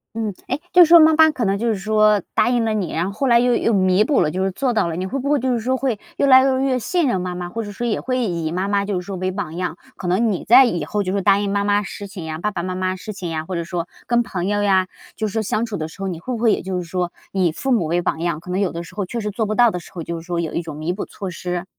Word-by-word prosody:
嗯。 220 -3 -2
诶， 265 +4 -2
就 360 -1 +8
是 - - -6
说 340 0 +9
妈 315 0 +6
妈 315 0 +6
可 245 -6 -2
能 195 0 +1
就 235 +3 -2
是 220 - +1
说 215 +1 +3
答 - - +3
应 245 -2 +2
了 220 - 0
你， 200 -6 -2
然 165 +2 0
后 195 - -3
后 265 +7 -2
来 235 -1 +5
又 245 0 +3
又 230 - +1
弥 185 +1 +3
补 290 - +2
了， - - +2
就 185 +1 -1
是 195 - 0
做 255 +7 -1
到 215 -6 +1
了， 165 - -3
你 180 +2 -3
会 265 +9 -3
不 275 +2 -3
会 295 -1 +3
就 255 +1 0
是 235 - 0
说 255 +4 0
会 255 -6 -1 0.2
越 - - +2
来 260 -1 +8
越 270 - +3
容 265 +1 +1
易 255 - +1
信 330 - 0
任 215 -7 +1
妈 180 0 -3
妈？ 175 0 -5
或 225 +5 -4
者 205 - -7
说 240 +4 -4
也 220 - 0
会 255 0 -1
以 170 -6 -2
妈 185 +3 -1
妈 200 0 +1
就 200 -3 -1
是 180 - -9
说 195 -1 -5
为 185 +1 -2
榜 180 -5 -5
样？ 180 -1 -3 0.2
可 185 - -5
能 210 +5 +2
你 185 - -4
在 255 +5 +8
以 175 -9 -1
后 205 +7 -2
就 185 - -2
是 200 - 0
答 200 +1 +4
应 200 -1 -1
妈 200 0 +1
妈 205 0 +2
事 200 0 -7
情 190 -4 -8
呀， 155 0 -4
爸 210 +5 -2
爸 180 -4 -3
妈 185 0 -3
妈 185 0 -1
事 200 +3 -7
情 185 -3 -6
呀， 160 -1 -3
或 185 - -5
者 170 - -2
说 170 0 -4 0.2
跟 240 0 +3
朋 180 -6 -4
友 205 0 0
呀， 190 -2 +3 0.3
就 215 - -2
是 200 - -7
说 225 - 0
相 220 +2 -1
处 215 -3 -5
的 155 -2 -3
时 180 - -13
候， 195 - -2
你 175 -3 -4
会 255 +9 -5
不 235 - -2
会 225 -1 +3
也 - - -2
就 185 -1 -3
是 180 - -3
说 175 +1 -3 0.2
以 185 -4 +1
父 265 +11 -3
母 225 -9 +2
为 170 +3 0
榜 160 - -2
样？ 170 -2 -1
可 180 +2 -9
能 185 - 0
有 195 -3 0
的 170 +1 -5
时 170 - -13
候 205 -2 -2
确 235 +6 -4
实 210 -1 -3
做 220 +2 -1
不 215 +1 -2
到 240 -1 +5
的 180 - -4
时 - - -15
候， 170 - -5
就 170 +1 -4
是 - - -10
说 175 0 -2
有 165 -2 -3
一 - - -1
种 160 -3 -8
弥 155 +4 -2
补 200 - -5
措 195 -2 -7
施？ 180 +1 -4
200 Hz, 375 characters per minute, -21 LUFS, 180-230 Hz, 0.3 s, 说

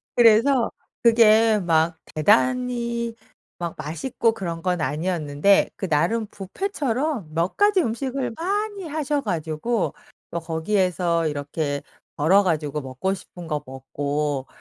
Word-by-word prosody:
그래서 235 +2 +5 0.3
그게 225 -1 +6
막 165 -2 +1 0.2
대단히 235 - +1 0.4
막 170 -1 -4
맛있고 165 - -1
그런 170 -6 -5
건 180 -1 0
아니었는데 155 +4 +2
그 190 - -4
나름 180 +9 +1
뷔페처럼 255 - -3
몇 170 +3 -1
가지 410 -2 +4
음식을 250 +1 -2
많이 400 +1 -2
하셔 295 -1 -1
가지고 175 - -1 0.4
거 170 - -2
거기에서 170 0 0
이렇게 145 0 -3 0.3
벌어 185 +7 +4
가지고 155 -5 -1
먹고 130 +9 -2
싶은 180 -2 -10
거 150 -2 -2
먹고 140 +1 -3
190 Hz, 250 characters per minute, -23 LUFS, 155-235 Hz, 0.4 s, 그게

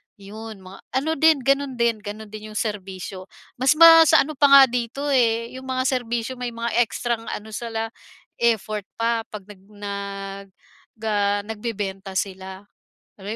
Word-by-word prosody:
'Yon 215 0 -10
mga 185 +1 -12 0.2
ano 280 +4 0
din, 320 0 +5
gano'n 275 0 +1
din, 235 -2 +1
gano'n 210 +1 -8
din 215 0 -8
'yong - - -12
serbisyo 190 -3 -5 0.3
mas 260 +3 +4
ma 330 0 +9
sa 320 - +6
ano 295 - -6
pa 285 - +5
nga 275 -1 +9
dito, 245 +4 -3
eh, 230 -3 +2
'yong 260 - -12
mga 255 0 -1
serbisyo 245 0 -3
may 245 -1 -4
mga 230 0 -3 0.2
ekstrang 235 +1 -3
ano 215 +1 -6
sila, 225 0 -4 0.5
effort 215 -3 0
pa 230 0 0
'pag 210 -2 -9
nag 205 -3 -14
nag 200 -1 -7 0.5
ga 205 -2 0
nagbebenta 205 -3 -5
sila. 190 0 -5 0.5
Alam 195 - -13
225 Hz, 155 wpm, -23 LUFS, 205-245 Hz, 0.5 s, ma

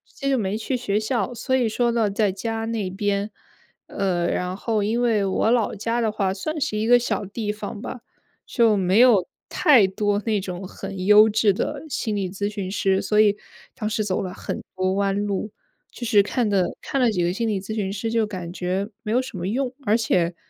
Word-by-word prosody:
接 275 -1 -2
就 265 - +2
没 205 -1 -1
去 250 +4 -2
学 205 -4 -1
校， 235 +3 -1
所 245 +2 -3
以 255 -3 +3
说 235 +2 +1
呢 230 -3 +1
在 200 0 +1
家 225 +3 -3
那 225 -4 -2
边， 200 +1 -1 0.6
呃， 180 -3 -1
然 180 +1 -2
后 215 0 -1
因 225 +4 0
为 220 -4 +2
我 195 +3 +1
老 235 -3 +1
家 230 +3 -1
的 225 - +1
话 195 -3 0
算 305 +10 -4
是 240 -7 -1
一 220 +1 -1
个 245 - +7
小 220 -4 -2
地 210 +2 -3
方 210 0 -7
吧。 250 - -7 0.5
就 230 -4 +3
没 190 +3 +2
有 225 -8 +5 0.2
太 255 - +5
多 205 +1 0
那 215 -2 +2
种 185 -1 -6
很 195 -1 -7
优 210 +1 +8
质 220 -1 +3
的 275 +9 -3
心 220 -6 -2
理 195 -3 -2
咨 200 +2 -3
询 205 -3 -4
师， 195 -1 +1
所 210 - +1
以 210 -1 +5 0.4
当 215 - -3
时 215 -1 -1
走 185 - -1
了 185 - -4
很 - - -5
多 185 0 0
弯 200 +1 0
路。 205 +1 -2 0.4
就 240 - -7
是 215 -3 +5
看 215 +2 0
的 190 -3 +1
看 275 - -2
了 245 - +4
几 180 -5 0
个 175 - +1
心 230 +4 -1
理 210 -3 0
咨 215 +2 -6
询 200 -3 -2
师 225 +3 -3
就 225 -2 +1
感 180 -5 -6
觉 185 +3 -2
没 215 -2 -4
有 250 - +3
什 255 -7 -8
么 175 - -3
用， 250 +4 -1
而 215 +2 +3
且 180 -6 +1
210 Hz, 235 characters per minute, -23 LUFS, 195-230 Hz, 0.6 s, 优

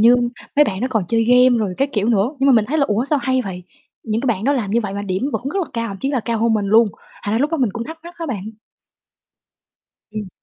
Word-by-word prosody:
như 235 +3 +7 0.4
mấy 295 - +7
bạn 190 -6 -3
đó 255 - +1
còn 220 -6 0
chơi 225 -1 +2
game 250 +1 +5
rồi 200 -4 -1
các 275 - +1
kiểu 210 0 0
nữa, 220 0 +2
nhưng 270 - +2
mà 275 - +6
mình 225 -3 +4
thấy 310 +7 -1
là 280 - +4
"Ủa, 215 +4 +1
sao 290 +1 +2
hay 260 +1 +1
vậy?" 180 -3 -6 0.4
Những 220 0 -1
cái 270 - -3
bạn 220 -4 0
đó 280 - +3
làm 230 -8 -1
như 235 - +2
vậy 200 -3 -4
và 200 - -3
điểm 195 +7 -2
vẫn - - -2
rất 390 - -2
là 330 - -6
cao, 230 -1 -2
thậm 200 - -6
chí 270 - -1
là 265 -4 0
cao 230 0 -2
hơn 230 +1 +2
mình 205 -2 0
luôn. 220 +2 +5 0.3
Thành 205 - -1
ra - - +2
lúc 290 +4 +1
đó 330 - 0
mình 250 -7 +1
cũng 230 +2 -4
thắc 320 +4 -8
mắc 345 +1 -11
á 335 - -4
bạn. 215 -6 -4 1.6
Ừm. 210 -2 -5
230 Hz, 295 wpm, -20 LUFS, 210-265 Hz, 1.6 s, như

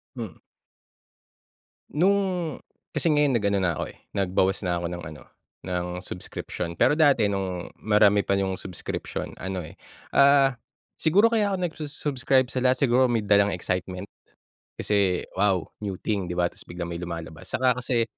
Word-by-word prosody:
Hmm. 110 -9 -6 1.6
Nung 190 +6 +4 0.8
kasi 165 - +2
ngayon 145 -3 +3
nag 105 - -3
ano 100 - +2
na 85 -4 0
ko, - - -1
eh, - - -12 0.2
nagbawas 95 +1 +1
na 85 -1 0
ako - - -3
ng 90 -1 -6
ano, 75 - -13 0.5
ng 90 -1 -1 0.2
subscription, 90 -2 -5
pero 145 - +3
dati 140 -9 +5
nung 95 -3 -3
marami 105 -1 +4
pa - - +1
yung 95 -1 0
subscription 90 -3 -5
ano, 95 0 -4
eh, 80 -1 -10 0.4
ah, 140 -1 +6 0.4
siguro 195 +8 +4
kaya 210 -3 +2
ako - - 0
nagsu-subscribe 145 -5 0
sa 130 - -2
lahat 130 +1 +3
siguro 125 +2 +5
may 115 -2 +1
dalang 100 -1 +3
excitement. 90 +1 -3 0.7
Kasi 100 -3 +1
wow, 95 -4 +2 0.2
new 100 -3 -3
thing 100 -4 -1
'di 90 - -4
ba 90 0 +2
ta's - - -12
biglang 85 0 -5
may 85 - -5
lumalabas. 85 0 -7
Tsaka 125 0 +1
kasi 120 -2 +1
100 Hz, 160 wpm, -26 LUFS, 90-130 Hz, 1.6 s, ah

